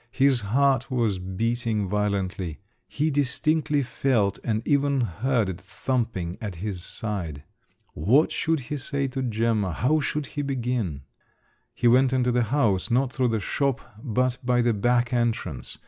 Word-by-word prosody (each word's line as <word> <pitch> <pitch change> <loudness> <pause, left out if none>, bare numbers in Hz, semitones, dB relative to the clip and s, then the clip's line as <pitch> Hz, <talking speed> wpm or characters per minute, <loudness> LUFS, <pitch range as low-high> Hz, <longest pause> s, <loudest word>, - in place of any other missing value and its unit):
His 135 -1 +4
heart 135 +7 +2
was 115 -7 0
beating 110 +3 -1
violently; 100 -4 -2 0.3
he 155 +2 0
distinctly 145 +2 +1
felt, 120 -6 0
and 110 -1 -1
even 140 -2 +2
heard 115 +2 0
it 90 -1 -5
thumping 105 -4 -2
at 100 -5 -4
his 90 0 -4
side. 90 -12 -4 0.5
What 120 - +3
should 160 -2 0
he 145 +4 -4
say 140 0 -2
to 130 +1 -3
Gemma, 110 -5 0
how 145 - +2
should 150 0 -2
he 145 - -4
begin? 125 - -2 0.7
He 120 - +2
went 130 +2 +5
into 125 -1 +2
the 120 -1 +2
house, 110 -6 +1
not 125 +2 +1
through 130 -1 +1
the 115 -2 0
shop, 135 +6 0 0.2
but 125 0 0
by 125 -1 +2
the 120 -1 +3
back 120 +4 +1
entrance. 115 - -2
120 Hz, 150 wpm, -25 LUFS, 100-135 Hz, 0.7 s, went